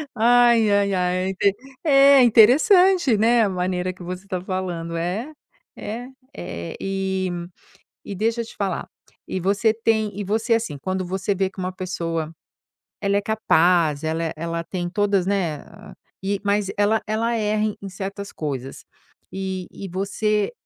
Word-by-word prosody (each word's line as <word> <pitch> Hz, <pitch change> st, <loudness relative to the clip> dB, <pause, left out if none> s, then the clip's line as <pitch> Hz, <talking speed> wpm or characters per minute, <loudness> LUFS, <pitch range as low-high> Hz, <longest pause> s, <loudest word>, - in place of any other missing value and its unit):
Ai, 235 Hz, -1 st, +5 dB
ai, 200 Hz, -1 st, +2 dB
ai. 180 Hz, 0 st, +1 dB
É -, -, -1 dB
inte 195 Hz, +1 st, +1 dB, 0.3 s
é, 275 Hz, -2 st, +6 dB
interessante, 285 Hz, -, +5 dB
né, 230 Hz, +2 st, +4 dB
a 200 Hz, -, +1 dB
maneira 180 Hz, 0 st, -2 dB
que 180 Hz, -, -12 dB
você 180 Hz, +2 st, -6 dB
está 185 Hz, -2 st, -4 dB
falando. 180 Hz, -3 st, -4 dB
É, 195 Hz, -, -3 dB, 0.5 s
é. 235 Hz, +4 st, -6 dB, 0.3 s
Eh, 85 Hz, -1 st, -6 dB
e 190 Hz, -1 st, -2 dB, 0.7 s
e 200 Hz, -, -6 dB
deixa 225 Hz, +4 st, 0 dB
eu -, -, -5 dB
te -, -, -13 dB
falar. 195 Hz, -4 st, -3 dB, 0.4 s
E 190 Hz, -, -3 dB
você 200 Hz, +4 st, +2 dB
tem 220 Hz, -3 st, 0 dB
e -, -, -2 dB
você, 220 Hz, +4 st, 0 dB
assim, 225 Hz, -11 st, -1 dB
quando 185 Hz, +1 st, -3 dB
você 190 Hz, +2 st, -2 dB
vê 190 Hz, 0 st, 0 dB
que 190 Hz, -, -14 dB
uma 185 Hz, 0 st, -2 dB
pessoa, 165 Hz, -3 st, -4 dB, 0.7 s
ela 200 Hz, 0 st, +1 dB
é -, -, +3 dB
capaz, 170 Hz, -7 st, +2 dB
ela 160 Hz, +1 st, -1 dB
é 160 Hz, -, -2 dB
ela 165 Hz, +1 st, -3 dB
tem 175 Hz, 0 st, -4 dB
todas, 200 Hz, -1 st, +1 dB
né, 185 Hz, -6 st, 0 dB
a 210 Hz, 0 st, -14 dB, 0.3 s
e, 200 Hz, 0 st, -1 dB
mas 200 Hz, -1 st, +1 dB
ela 205 Hz, +2 st, +2 dB
ela 225 Hz, +2 st, 0 dB
erra 215 Hz, 0 st, 0 dB
em 215 Hz, -1 st, -2 dB
em 195 Hz, -, -5 dB
certas 195 Hz, +1 st, -6 dB
coisas. 135 Hz, -4 st, -5 dB, 0.5 s
E 190 Hz, -1 st, -4 dB
e 195 Hz, -, -8 dB
você 205 Hz, -, -1 dB
195 Hz, 165 wpm, -22 LUFS, 180-220 Hz, 0.7 s, é